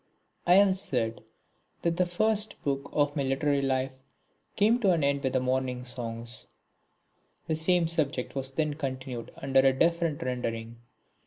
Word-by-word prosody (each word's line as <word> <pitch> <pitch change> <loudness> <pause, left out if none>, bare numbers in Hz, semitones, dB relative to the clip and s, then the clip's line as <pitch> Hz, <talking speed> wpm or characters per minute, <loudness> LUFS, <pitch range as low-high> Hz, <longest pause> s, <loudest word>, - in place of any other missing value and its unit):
I 175 - +7
have 195 -1 +6
said 115 - -2 0.6
that 170 0 +1
the 180 -1 +2
first 215 +4 +1
book 140 0 -2
of 145 -1 +1
my 145 - 0
literary 140 +1 +1
life 130 -1 -1 0.6
came 220 +4 +3
to 195 -6 +4
an 165 -4 0
end 140 0 +1
with 130 - 0
the 130 - +3
Morning 130 -1 -1
Songs. 120 -1 -5 1.0
The 160 - 0
same 170 +1 +3
subject 150 -6 0
was 135 -1 -2
then 150 +2 -1
continued 130 -4 -5
under 135 0 +2
a 135 0 +4
different 170 -2 +1
rendering. 115 -2 -3
140 Hz, 155 wpm, -28 LUFS, 130-170 Hz, 1.0 s, I